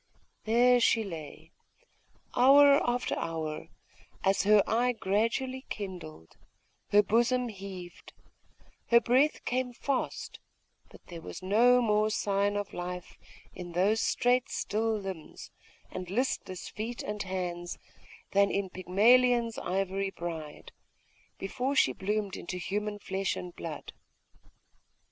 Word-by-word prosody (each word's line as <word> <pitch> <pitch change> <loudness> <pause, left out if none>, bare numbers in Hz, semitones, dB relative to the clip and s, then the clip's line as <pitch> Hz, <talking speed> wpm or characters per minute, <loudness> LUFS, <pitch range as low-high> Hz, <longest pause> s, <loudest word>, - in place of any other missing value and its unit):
There 245 +2 +5
she 230 -1 +3
lay, 160 -3 -9 0.8
hour 280 +3 +7
after 245 0 -1
hour, 160 -1 -4 0.6
as 195 0 +3
her 210 0 +6
eye 245 +2 +1
gradually 230 +6 -1
kindled, 175 - -7 0.5
her 210 0 +5
bosom 240 +3 +2
heaved, 190 -4 -9 0.8
her 235 - +6
breath 255 +6 +2
came 250 0 -1
fast: 270 +2 -3 0.5
but - - -17
there 170 -2 -9
was 185 - -9
no 240 +6 +4
more 215 -1 +2
sign 200 -1 0
of 205 0 -4
life 180 0 -6 0.3
in 175 -1 -8
those 200 +6 +2
straight 245 +1 +2
still 220 +1 -1
limbs, 190 -6 -8 0.4
and 185 -1 -6
listless 195 -4 -2
feet 230 +3 -5
and 210 0 -4
hands, 175 -2 -4 0.5
than 200 0 +4
in 195 -2 -2
Pygmalion's 230 +5 +3
ivory 195 +1 -1
bride, 165 -5 -7 0.7
before 255 +8 -2
she 130 - +4
bloomed 205 +4 -2
into 180 - -6
human 205 +3 -3
flesh 195 -1 -2
and 180 -1 -7
blood. 160 -3 -7
205 Hz, 115 wpm, -30 LUFS, 180-240 Hz, 0.8 s, hour